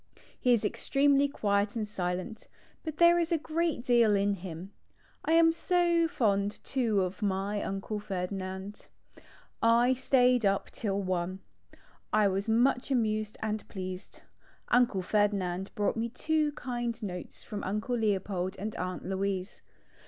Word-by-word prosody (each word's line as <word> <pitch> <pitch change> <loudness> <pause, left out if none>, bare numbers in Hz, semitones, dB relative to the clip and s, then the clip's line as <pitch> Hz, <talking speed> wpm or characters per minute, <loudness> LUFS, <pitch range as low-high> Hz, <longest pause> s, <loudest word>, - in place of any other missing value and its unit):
He 250 - +2
is 230 -3 +3
ex - - -4
tremely 280 0 +4
quiet 205 -4 0
and 215 -2 -2
silent, 185 +2 -4 0.4
but 315 -2 -5
there 345 0 +6
is 335 0 -1
a 335 - +3
great 320 -3 -1
deal 235 -4 +4
in 200 +1 +2
him. 185 0 -7 0.5
1 320 - +3
am 330 0 +6
so 340 -1 +2
fond 205 - 0
too 230 -7 +1
of 185 +4 -5
my 200 +1 -1
Uncle 195 +2 -3
Ferdinand. 190 +1 -5 0.7
I 235 +2 +4
stayed 250 -1 +3
up 195 -1 +1
till 195 -4 -2
i. 180 +1 -2 0.7
I 215 -1 +4
was 195 +3 -1
much 245 +3 +2
amused 215 -4 0
and 215 -1 -3
pleased. 185 -1 -7 0.5
Uncle 240 -6 +3
Ferdinand 195 -2 0
brought 205 - 0
me 230 +1 -2
two 305 +4 0
kind 240 -3 -3
notes 180 -3 -7
from 205 -1 -6
Uncle 210 +5 -2
Leopold 195 -4 -1
and 210 +2 -5
Aunt 185 0 -4
Louise. 190 0 -3
210 Hz, 145 wpm, -30 LUFS, 195-250 Hz, 0.7 s, there